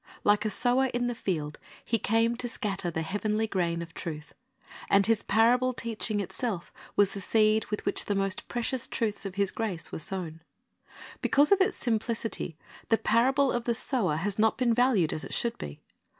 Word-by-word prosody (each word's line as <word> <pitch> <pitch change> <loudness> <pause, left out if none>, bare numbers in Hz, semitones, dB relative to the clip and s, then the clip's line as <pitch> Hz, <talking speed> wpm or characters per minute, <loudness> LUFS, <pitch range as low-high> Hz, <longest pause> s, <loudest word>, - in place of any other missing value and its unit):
Like 205 +1 +3
a - - +2
sower 245 +5 +2
in 245 0 0
the 245 - -1
field, 155 -9 -3 0.3
He 230 - 0
came 225 +3 +2
to 245 - -3
scatter 195 -6 -2
the 160 -1 -2
heavenly 210 +5 -1
grain 170 -5 -1
of 165 -1 -12
truth. 155 -2 -7 0.6
And 200 0 +5
His 225 -1 +2
parable 245 +4 +3
teaching 225 -2 -2
itself 200 -1 -4 0.2
was 200 -1 +4
the 200 - -6
seed 215 +1 +3
with 210 - -4
which - - +1
the 205 - -1
most 195 0 -1
precious 245 +1 -1
truths 210 -2 -2
of 190 - -9
His 200 -1 +1
grace 205 -7 -3
were - - -5
sown. 165 -2 -3 0.8
Because 290 +4 +3
of 400 -1 +5
its 380 - +2
simplicity 225 -7 -2 0.3
the 225 - +4
parable 265 +6 +3
of 240 -1 -2
the 235 - +1
sower 225 - +1
has 195 +6 -2
not 220 0 +3
been 245 -3 +2
valued 230 -9 +3
as 155 - -4
it - - -5
should 235 -1 -1
be. 70 0 -7
215 Hz, 190 wpm, -28 LUFS, 190-235 Hz, 0.8 s, And